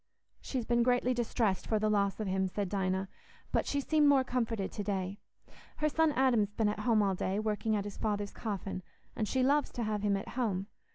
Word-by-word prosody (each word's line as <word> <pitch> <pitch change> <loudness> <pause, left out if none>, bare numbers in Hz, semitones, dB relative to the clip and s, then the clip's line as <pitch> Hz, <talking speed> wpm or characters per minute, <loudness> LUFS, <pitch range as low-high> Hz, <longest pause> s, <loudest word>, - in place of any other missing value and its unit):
"She's 255 -4 -3
been 240 0 +2
greatly 250 +1 +3
distressed 225 -6 0
for 220 - +2
the 215 0 +1
loss 200 -1 +1
of 215 - -2
him," 190 0 0
said 190 +1 -3
Dinah, 190 -1 0 0.4
"but - - +1
she's 280 -1 -1
seemed 305 -2 +4
more 275 -2 +5
comforted 230 -6 -1
to 205 - -4
day. 195 -1 -2 0.6
Her 305 - +1
son 320 +1 +3
Adam's 245 -6 +3
been 220 -2 +2
at 210 - -3
home 215 -1 +3
all 195 -1 +2
day, 190 +1 -1
working 215 0 0
at 205 - 0
his 205 - -7
father's 205 -2 -1
coffin, 200 -3 -4 0.3
and 215 - -1
she 260 +3 +1
loves 285 +2 +3
to 240 - -2
have 215 -1 -1
him 205 -1 +2
at 195 - -6
home. 210 -7 -1
215 Hz, 215 wpm, -32 LUFS, 200-245 Hz, 0.6 s, more